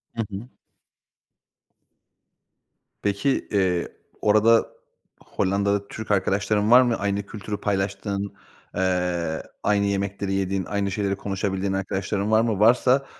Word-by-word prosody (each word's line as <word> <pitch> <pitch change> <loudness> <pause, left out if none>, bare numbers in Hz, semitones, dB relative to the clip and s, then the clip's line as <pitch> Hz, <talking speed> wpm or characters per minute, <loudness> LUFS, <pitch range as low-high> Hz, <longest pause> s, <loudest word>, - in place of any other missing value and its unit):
Hı 115 - -1
hı. 100 +6 -7 2.5
Peki, 100 +7 0
eee, 95 -4 +1 0.3
orada 110 +2 +4 0.6
Hollanda'da 100 +1 0
Türk 110 0 -6
arkadaşların 105 +2 +1
var 125 +1 +9
mı? 120 -2 +2
Aynı 100 0 -1
kültürü 105 0 -6
paylaştığın, 100 0 -2 0.4
eee, 90 -3 0 0.2
aynı 100 -1 +2
yemekleri 100 0 -1
yediğin, 95 -1 -1
aynı 100 0 -1
şeyleri 100 0 -1
konuşabildiğin 95 0 -2
arkadaşların 95 +2 -2
var 110 0 +5
mı? 110 -4 0
Varsa, 125 +5 +4
100 Hz, 110 wpm, -24 LUFS, 95-105 Hz, 2.5 s, var